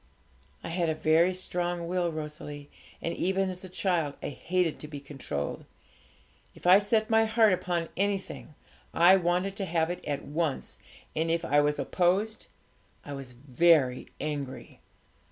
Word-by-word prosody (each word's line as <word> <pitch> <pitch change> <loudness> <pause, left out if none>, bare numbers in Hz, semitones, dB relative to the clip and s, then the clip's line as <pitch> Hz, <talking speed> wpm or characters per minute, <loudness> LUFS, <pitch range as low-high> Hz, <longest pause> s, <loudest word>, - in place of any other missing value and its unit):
'I - - -5
had 170 -1 0
a 160 - 0
very 160 +3 +3
strong 175 -2 -2
will, 175 -1 0
Rosalie, 150 -2 -7 0.3
and 170 - -2
even 190 +1 0
as 185 0 -9
a 185 - -7
child 175 -5 0
I - - -2
hated 175 +2 -1
to 150 - -6
be 145 -1 -7
controlled. 135 - -5 0.9
If - - -15
I 185 +2 +8
set 215 +2 +1
my 225 0 +5
heart 220 -2 +4
upon 175 -2 -1
anything, 195 -5 -2 0.4
I 175 +3 +7
wanted 180 +2 0
to 195 - -2
have 165 -1 0
it 180 - -6
at 145 -2 -3
once, 155 -1 -2 0.4
and 160 +1 0
if 165 0 0
I 145 -1 +4
was 150 0 +1
opposed, 185 +9 0 0.6
I 145 - -6
was 135 -3 -8
very 130 +1 +2
angry. 140 -5 -5
170 Hz, 155 wpm, -28 LUFS, 150-185 Hz, 0.9 s, I